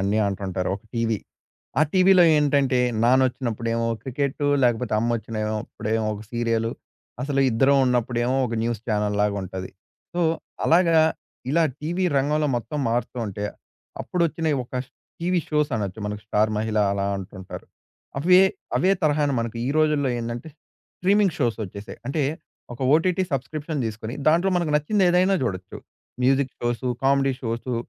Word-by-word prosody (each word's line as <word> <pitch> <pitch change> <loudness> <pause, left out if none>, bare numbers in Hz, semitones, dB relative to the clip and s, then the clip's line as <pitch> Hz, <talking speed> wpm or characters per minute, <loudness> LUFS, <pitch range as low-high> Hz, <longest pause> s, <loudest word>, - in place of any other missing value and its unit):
అన్నీ 100 +3 +1
అంటుంటారు, 95 -2 -2
ఒక - - -18
టీవీ. 115 -2 0 0.6
ఆ - - +6
టీవీలో 185 -1 +6
ఏంటంటే, 140 -3 +2 0.3
నాన్నొచ్చినప్పుడేమో 120 -2 +1
క్రికెట్టు, 140 +2 -1 0.2
లేకపోతే 120 0 +1
అమ్మ 115 +2 0
వచ్చినయో 110 -1 -3
అప్పుడేమో 110 +1 -2
ఒక 105 - -8
సీరియలు, 115 -1 0 0.5
అసలు 140 0 0
ఇద్దరం 135 +4 +4
ఉన్నప్పుడేమో 125 +1 +1
ఒక 115 - -4
న్యూస్ 115 -2 -2
ఛానెల్‌ 105 -1 0
లాగా 105 -1 +1
ఉంటది. 95 0 -6 0.4
సో, 175 - 0 0.5
అలాగా, 165 -1 +5 0.5
ఇలా 165 +1 +4 0.2
టీవీ 175 +5 -1
రంగంలో 150 +2 +1
మొత్తం 150 +6 -4
మారుతూ 120 +2 -2
ఉంటే, 100 +1 -5 0.6
అప్పుడు 180 - -1
వచ్చినయి 160 -2 -1
ఒక 125 - -14 0.5
టీవీ 175 +1 +1
షోస్ 150 -1 +1
అనొచ్చు, 100 -2 -4
మనకు 105 0 -5
'స్టార్ 105 +1 +2
మహిళ' 110 0 0
అలా 100 0 -1
అంటుంటారు. 95 -1 -9 0.5
అవే 180 +6 +6 0.3
అవే 185 - +3
తరహాను 150 -2 +2
మనకు 115 0 -5
ఈ - - 0
రోజుల్లో 150 -3 +2
ఏందంటే, 120 +5 -5 0.5
స్ట్రీమింగ్ 195 0 +3
షోసొచ్చేసాయి. 110 -4 -3
అంటే 145 +3 -1 0.5
ఒక 120 - -6
ఓటీటీ 175 +4 +3
సబ్‌స్క్రిప్షన్ 145 +3 -3
తీసుకొని, 110 +2 -5
దాంట్లో 170 +5 +3
మనకు 170 -3 0
నచ్చింది 190 +8 +1
ఏదైనా 180 +2 +3
చూడొచ్చు. 95 -6 -4 0.4
Music 135 +1 +2
shows, 120 +1 -2 0.2
comedy 135 0 +3
shows, 120 +1 -3
125 Hz, 140 wpm, -24 LUFS, 110-150 Hz, 0.6 s, ఆ